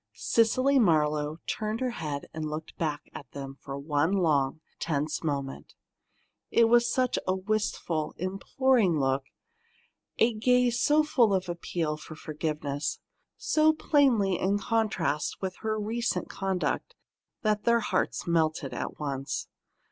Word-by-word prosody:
Cecily 255 +5 +3
Marlowe 155 -5 +2
turned 215 +1 -2
her 255 -1 0
head 150 -9 -4
and 155 -1 -3
looked 155 +1 -6
back 150 -3 -2
at 140 - -9
them 135 -1 -7
for 135 0 -6
one 145 +4 +1
long, 155 -6 +2 0.2
tense 150 0 -1
moment. 140 -3 -4 0.7
It 230 -1 +5
was 240 0 +4
such 255 -1 +1
a 185 - +2
wistful, 190 -6 -2
imploring 195 - +1
look, 135 0 +1 0.9
a 230 +1 +4
gaze 245 +2 +2
so 300 +1 +4
full 235 -9 +3
of 185 -1 -1
appeal 170 -2 -2
for 155 +1 -10
forgiveness, 150 -2 -3 0.4
so 310 0 +3
plainly 250 - +3
in 195 +2 +2
contrast 205 -9 0
with 190 -1 -4
her 220 -1 -2
recent 230 +3 -2
conduct, 190 -2 -2 0.5
that 210 -1 +1
their 235 0 +4
hearts - - -1
melted 155 -5 0
at - - -4
once. 140 -2 -3
180 Hz, 135 wpm, -28 LUFS, 150-230 Hz, 0.9 s, It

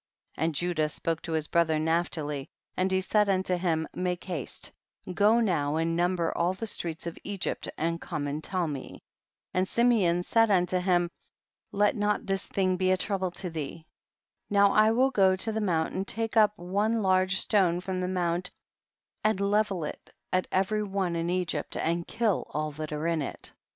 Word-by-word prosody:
33. - - -2
And 165 -2 -1
Judah 160 -1 0
spoke 165 +1 -2
to 165 - -5
his 155 -1 0
bro 170 - +4
ther 160 -1 0
Naphtali, 155 -3 -1 0.3
and 185 +1 0
he 190 0 +2
said 210 +2 +2
unto 185 -1 +1
him, 165 -3 0
make 180 -1 -2
haste, 175 -8 -5 0.4
go 210 +5 +4
now 160 -10 +1
and 165 +1 0
number 175 -1 0
all 175 +2 +1
the 225 - -4
streets 170 -7 -3
of 170 - -6
Egypt 200 -2 -3
and 165 +1 -1
come 150 -4 -4
and 145 +2 -3
tell 180 -3 -1
me; 140 -4 -7 0.5
and 185 +1 +1
Simeon 205 -8 +3
said 225 +3 +3
unto 180 -2 +2
him, 175 -1 +1 0.6
let 205 +1 +2
not 210 0 0
this 195 -1 -1
thing 185 -2 +1
be 185 0 +1
a 185 - +4
trouble 190 -1 -1
to 180 0 -4
thee; 160 0 -6 0.6
now 200 -1 +5
I 215 +1 +5
will 255 +4 +3
go 190 -5 +4
to 205 +4 -2
the 220 0 -2
mount 165 -6 0
and 190 +1 -3
take 225 +1 -2
up 210 -1 +4
one 205 +5 0
large 185 0 +3
stone 185 -4 +2
from 185 0 -3
the 180 - -1
mount 180 -1 -1 0.7
and 215 -2 +2
level 200 -3 +1
it 150 - -7 0.2
at 185 0 +1
every 195 +3 +1
one 195 -4 -1
in 170 0 -1
Egypt 175 -4 -2
and 170 +1 -1
kill 225 -5 0
all 155 0 -1
that 155 +1 -6
are 150 +1 -3
in 165 -2 +1
it. 140 - -7
180 Hz, 190 wpm, -28 LUFS, 165-200 Hz, 0.7 s, now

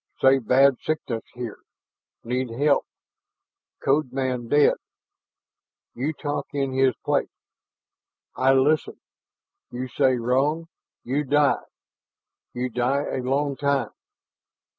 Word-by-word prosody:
Say 135 0 +5
bad 130 +2 +4
sickness 130 -7 -2
here 120 -3 -6 0.6
need 125 +1 -2
help. 140 +5 +1 1.0
Code 135 -1 +2
man 130 -2 -2
dead 145 +3 +5 1.2
you 135 +6 -2
talk 145 -1 -4
in 135 -2 -1
his 130 -2 +3
place. - - +1 1.1
I 130 +1 +3
listen. 145 +3 +2 0.7
You 125 +1 -5
say 130 0 +2
wrong, 140 +7 0 0.3
you 140 +4 -1
die 145 +1 +2 0.9
you 125 +1 -2
die 125 +4 0
a 130 - -2
long 140 +2 0
time. 140 -1 0
135 Hz, 105 wpm, -24 LUFS, 125-145 Hz, 1.2 s, Say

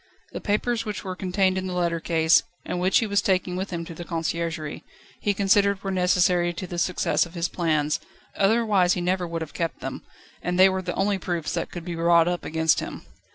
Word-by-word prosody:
The - - -6
papers 225 +3 0
which 210 -1 -5
were 185 -1 -4
contained 185 0 +1
in 185 - -4
the 180 - -4
letter 170 -1 0
case, 160 0 +4 0.2
and 180 - -3
which 185 +2 +3
he 230 - +2
was 200 -1 +1
taking 185 -2 0
with 190 +2 -3
him 170 -2 -4
to 165 - -8
the 175 - -7
Conciergerie, 165 -2 -3 0.4
he 205 -1 0
considered 200 0 +3
were 195 - -2
necessary 180 -1 +2
to 175 +2 -5
the 175 -1 -5
success 180 -1 +1
of 170 - -16
his 170 0 0
plans, 155 -4 0 0.4
otherwise 200 -3 +3
he - - -2
never 180 0 0
would 165 -1 -3
have 150 -2 -10
kept 165 -1 -3
them, - - -5 0.4
and 180 0 -2
they 190 +1 +8
were 190 0 -1
the 180 -1 -4
only 195 0 +1
proofs 170 -3 -3
that 170 - -2
could 170 -1 -8
be 175 - -4
brought 170 0 +4
up 175 -1 -1
against 160 0 +2
him. - - -6
180 Hz, 220 wpm, -25 LUFS, 170-190 Hz, 0.4 s, they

